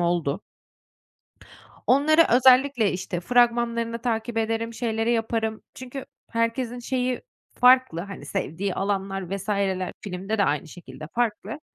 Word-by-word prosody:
oldu. 170 Hz, -4 st, 0 dB, 1.4 s
Onları 310 Hz, +5 st, +5 dB
özellikle, 255 Hz, -3 st, +5 dB
işte, 180 Hz, -1 st, -4 dB
fragmanlarını 235 Hz, +1 st, +2 dB
takip 225 Hz, -1 st, -1 dB
ederim, 225 Hz, +1 st, -1 dB
şeyleri 225 Hz, -1 st, 0 dB
yaparım. 225 Hz, -1 st, -1 dB
Çünkü 260 Hz, +1 st, -7 dB, 0.3 s
herkesin 230 Hz, +1 st, -1 dB
şeyi 250 Hz, 0 st, -2 dB, 0.4 s
farklı, 250 Hz, -8 st, +5 dB
hani, 195 Hz, -5 st, -8 dB
sevdiği 180 Hz, +6 st, -3 dB
alanlar 195 Hz, -1 st, -2 dB
vs. 200 Hz, -, -9 dB
ler 190 Hz, -2 st, 0 dB
filmde 195 Hz, +3 st, -4 dB
de 200 Hz, -, +4 dB
aynı 150 Hz, 0 st, -1 dB
şekilde, 155 Hz, -3 st, -10 dB
farklı. 240 Hz, +5 st, -2 dB
225 Hz, 120 wpm, -25 LUFS, 195-245 Hz, 1.4 s, Onları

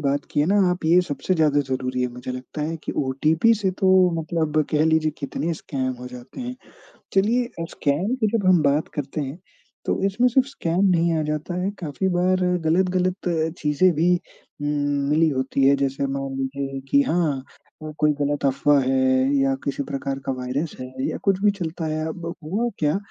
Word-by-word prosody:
बात 140 Hz, 0 st, 0 dB
की -, -, +1 dB
है 150 Hz, -, +2 dB
ना 200 Hz, +2 st, +3 dB
आप 180 Hz, -2 st, -3 dB
ये 170 Hz, +3 st, +5 dB
सबसे 145 Hz, +6 st, -1 dB
ज़्यादा 150 Hz, -3 st, +3 dB
ज़रूरी 130 Hz, -1 st, -2 dB
है, 125 Hz, -, 0 dB
मुझे 125 Hz, +1 st, -8 dB
लगता 130 Hz, +4 st, -6 dB
है 165 Hz, +2 st, -2 dB
कि -, -, -3 dB
ओटीपी 155 Hz, -, +2 dB
से 195 Hz, -3 st, 0 dB
तो 185 Hz, -1 st, +5 dB
मतलब 155 Hz, -1 st, 0 dB
कह 155 Hz, 0 st, +3 dB
लीजिए 160 Hz, -1 st, +2 dB
कितने 155 Hz, +4 st, -3 dB
स्कैम 130 Hz, -4 st, -3 dB
हो 125 Hz, -, -7 dB
जाते 125 Hz, -, -10 dB
हैं। 250 Hz, 0 st, -5 dB, 0.6 s
चलिए 225 Hz, +6 st, +3 dB
अ, 165 Hz, -, -2 dB
स्कैम 160 Hz, -, 0 dB
की 235 Hz, -4 st, +1 dB
जब 200 Hz, -, -3 dB
हम 180 Hz, -4 st, +5 dB
बात 145 Hz, +2 st, +2 dB
करते 145 Hz, +1 st, -3 dB
हैं, 140 Hz, +4 st, -5 dB, 0.5 s
तो -, -, 0 dB
इसमें 205 Hz, +6 st, +2 dB
सिर्फ़ 260 Hz, +2 st, +3 dB
स्कैम 185 Hz, -7 st, 0 dB
नहीं 170 Hz, -2 st, +3 dB
आ 155 Hz, -, +1 dB
जाता 150 Hz, +3 st, -3 dB
है, 190 Hz, -, 0 dB
काफ़ी 170 Hz, +2 st, -2 dB
बार 185 Hz, +1 st, +2 dB, 0.3 s
गलत-गलत 185 Hz, +2 st, +1 dB, 0.3 s
चीज़ें 150 Hz, +5 st, +3 dB
भी 170 Hz, +3 st, +3 dB, 0.5 s
उम, 145 Hz, -, -1 dB, 0.4 s
मिली 160 Hz, +2 st, +4 dB
होती 135 Hz, -1 st, 0 dB
है। 140 Hz, -, +6 dB
जैसे 140 Hz, 0 st, -1 dB
मान 135 Hz, 0 st, -3 dB
लीजिए 135 Hz, 0 st, -3 dB
कि 140 Hz, -, +5 dB
हाँ 150 Hz, -4 st, 0 dB, 0.4 s
अ, -, -, -5 dB
कोई 150 Hz, 0 st, +3 dB
गलत 145 Hz, 0 st, -1 dB
अफ़वाह 140 Hz, +2 st, +3 dB
है 130 Hz, +1 st, +2 dB
या 135 Hz, 0 st, +2 dB
किसी 140 Hz, 0 st, -2 dB
प्रकार 135 Hz, 0 st, -4 dB
का -, -, 0 dB
वायरस 135 Hz, +5 st, -3 dB
है 130 Hz, -, -5 dB, 0.2 s
या -, -, -3 dB
कुछ 195 Hz, -2 st, +2 dB
भी 205 Hz, -, +5 dB
चलता 165 Hz, -1 st, -3 dB
है, 155 Hz, 0 st, -2 dB
अब 165 Hz, +1 st, -6 dB, 0.2 s
हुआ 200 Hz, +10 st, -1 dB
क्या? 150 Hz, +3 st, +2 dB
155 Hz, 195 wpm, -23 LUFS, 140-180 Hz, 0.6 s, है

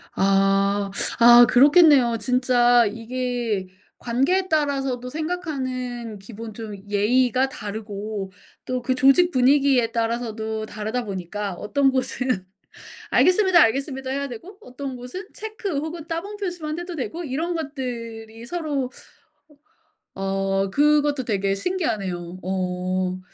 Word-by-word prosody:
아. 195 Hz, +1 st, +2 dB, 0.3 s
아 240 Hz, +1 st, +9 dB
그렇겠네요. 280 Hz, -4 st, +6 dB
진짜 245 Hz, 0 st, +3 dB
이게 230 Hz, -2 st, -3 dB, 0.3 s
관계에 280 Hz, +11 st, +1 dB
따라서도 270 Hz, -5 st, 0 dB
생각하는 260 Hz, -, -4 dB
기본 220 Hz, +2 st, -9 dB
좀 215 Hz, -1 st, -7 dB
예의가 250 Hz, +5 st, +2 dB
다르고 210 Hz, -4 st, -6 dB, 0.3 s
또 255 Hz, -1 st, -2 dB
그 255 Hz, +1 st, 0 dB
조직 275 Hz, +8 st, +5 dB
분위기에 260 Hz, -2 st, +3 dB
따라서도 225 Hz, -2 st, -2 dB
다르다 220 Hz, +3 st, -4 dB
보니까 195 Hz, +1 st, -4 dB
어떤 270 Hz, +9 st, +1 dB
곳은 255 Hz, -6 st, -1 dB, 0.7 s
"알겠습니다. 370 Hz, -1 st, +4 dB
알겠습니다." 265 Hz, +3 st, 0 dB
해야 280 Hz, +1 st, -2 dB
되고 350 Hz, -, -10 dB
어떤 265 Hz, -2 st, -7 dB
곳은 250 Hz, +10 st, -8 dB
체크 425 Hz, -6 st, -5 dB
혹은 320 Hz, +2 st, -5 dB
따봉 390 Hz, +6 st, -4 dB
표시만 350 Hz, -5 st, -4 dB
해도 350 Hz, -1 st, -6 dB
되고 325 Hz, +5 st, -4 dB
이런 315 Hz, +5 st, -2 dB
것들이 235 Hz, -6 st, -6 dB
서로 295 Hz, -5 st, -2 dB, 1.3 s
어 195 Hz, 0 st, -1 dB
그것도 290 Hz, 0 st, +2 dB
되게 195 Hz, -2 st, 0 dB
신기하네요. 195 Hz, -, -3 dB
어. 185 Hz, 0 st, -2 dB
250 Hz, 265 characters per minute, -23 LUFS, 210-290 Hz, 1.3 s, 아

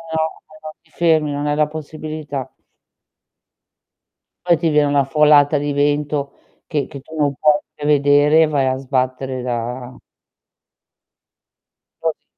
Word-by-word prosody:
No, 160 Hz, -, +1 dB, 0.4 s
non 155 Hz, -, -7 dB
ti 165 Hz, -, -30 dB
fermi, 155 Hz, -3 st, +2 dB
non 145 Hz, +1 st, -3 dB
hai 145 Hz, -, +1 dB
la 150 Hz, 0 st, +2 dB
possibilità. 155 Hz, -3 st, -6 dB, 2.0 s
Poi 170 Hz, -2 st, +4 dB
ti 165 Hz, 0 st, 0 dB
viene 150 Hz, -1 st, +3 dB
una 145 Hz, -1 st, +2 dB
folata 150 Hz, +1 st, +4 dB
di 145 Hz, 0 st, -2 dB
vento, 145 Hz, 0 st, 0 dB, 0.3 s
che 150 Hz, -4 st, -2 dB
che 140 Hz, -3 st, -9 dB
tu 160 Hz, +4 st, -13 dB
non 145 Hz, -2 st, +1 dB
puoi 150 Hz, +1 st, +3 dB
prevedere 145 Hz, +1 st, +3 dB
e -, -, +2 dB
vai 145 Hz, -3 st, 0 dB
a 130 Hz, 0 st, 0 dB
sbattere 130 Hz, -1 st, -2 dB
da 125 Hz, +1 st, -5 dB, 2.0 s
Così -, -, -3 dB
145 Hz, 130 wpm, -19 LUFS, 140-150 Hz, 2.0 s, Poi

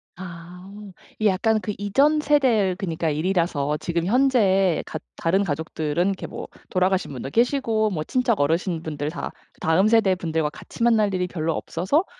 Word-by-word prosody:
아. 175 Hz, -1 st, -9 dB, 0.6 s
이 215 Hz, -, +3 dB
약간 215 Hz, +3 st, +2 dB
그 210 Hz, -, -3 dB
이전 275 Hz, +10 st, +2 dB
세대의 255 Hz, -11 st, +2 dB
그니까 165 Hz, -4 st, -2 dB
일이라서 155 Hz, -3 st, 0 dB
지금 170 Hz, +1 st, -2 dB
현재에 200 Hz, -, +3 dB
갖 -, -, -6 dB, 0.2 s
다른 190 Hz, +4 st, +1 dB
가족들은 160 Hz, +1 st, -1 dB
이렇게 195 Hz, -1 st, -2 dB
뭐 -, -, -7 dB, 0.2 s
돌아가신 185 Hz, -2 st, +1 dB
분도 135 Hz, 0 st, -6 dB
계시고 230 Hz, -, +1 dB
뭐 155 Hz, -5 st, -2 dB
친척 250 Hz, -, 0 dB
어르신분들 160 Hz, -1 st, -1 dB
다 170 Hz, -, -5 dB, 0.3 s
다음 175 Hz, +6 st, +3 dB
세대 215 Hz, -4 st, +4 dB
분들과 160 Hz, -3 st, -1 dB
같이 190 Hz, -, -12 dB
만날 215 Hz, -4 st, +3 dB
일이 180 Hz, -1 st, 0 dB
별로 165 Hz, -2 st, -2 dB
없어서 210 Hz, -, 0 dB
185 Hz, 340 characters per minute, -23 LUFS, 165-215 Hz, 0.6 s, 세대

